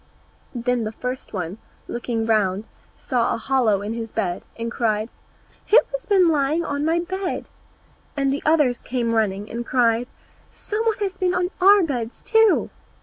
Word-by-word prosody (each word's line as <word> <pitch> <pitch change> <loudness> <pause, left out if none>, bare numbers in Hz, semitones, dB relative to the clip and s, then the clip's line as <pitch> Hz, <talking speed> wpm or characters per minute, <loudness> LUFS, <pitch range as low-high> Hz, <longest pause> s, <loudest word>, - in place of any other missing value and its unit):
Then 245 0 0
the 215 - -3
first 250 +3 -5
one, 185 +1 -4 0.3
looking 235 -1 -2
round, 210 -2 +1 0.3
saw 245 -3 0
a - - -4
hollow 230 -5 +1
in 210 +2 -3
his 225 -1 -5
bed, 180 -6 -2 0.2
and 230 0 -4
cried, 220 -2 0 0.6
"Who 440 - +6
has - - -5
been 385 -4 +5
lying 310 +1 +1
on 285 0 -2
my 325 +2 +2
bed?" 375 +1 -4 0.7
And 275 -1 +1
the 285 - -3
others 295 -6 +3
came 240 -2 -2
running, 205 -2 0
and 235 +1 -3
cried, 240 -1 +2 0.5
"Some 430 +2 -3
one 445 - +2
has 390 -2 -1
been 370 -1 0
on 360 +1 0
our 400 +1 +7
beds 245 -7 -4
too!" 445 -2 +3
245 Hz, 165 wpm, -22 LUFS, 225-335 Hz, 0.7 s, our